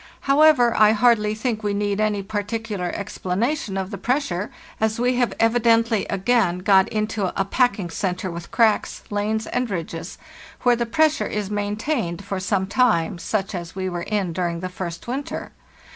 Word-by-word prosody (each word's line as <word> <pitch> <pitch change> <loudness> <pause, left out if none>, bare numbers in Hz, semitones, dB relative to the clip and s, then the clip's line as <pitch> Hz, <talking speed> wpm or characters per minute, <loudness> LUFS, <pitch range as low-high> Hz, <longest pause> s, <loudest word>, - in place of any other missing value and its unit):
However, 275 -4 +5
I 215 0 +6
hardly 215 -1 +3
think 220 -1 -2
we 205 -1 -1
need 205 0 0
any 210 -2 0
particular 205 -2 -3
explanation 200 +3 -2
of 190 +1 -3
the 200 - -6
pressure, 230 -8 -1 0.3
as 220 +1 0
we 250 +1 +1
have 245 -5 +1
evidently 230 -1 +3
again 195 -2 +2
got 190 0 +4
into 215 -3 -1
a 195 - +2
packing 200 -5 +1
centre 185 +1 -2
with 170 0 -7
cracks, 225 -3 +1
lanes, 215 +2 -1
and 250 -1 -2
ridges, 165 -2 -5 0.5
where 245 -1 +5
the 235 0 -2
pressure 315 +4 +2
is 210 -1 -3
maintained 205 - -2
for 195 -1 -3
some 190 0 0
time, 195 -6 +1
such 195 +2 -2
as 175 -2 -6
we 185 -1 -2
were 175 -1 -4
in 195 -2 -1
during 170 -1 -2
the 185 - -3
first 175 0 -6
winter. 270 +4 -4
210 Hz, 165 wpm, -22 LUFS, 185-230 Hz, 0.5 s, I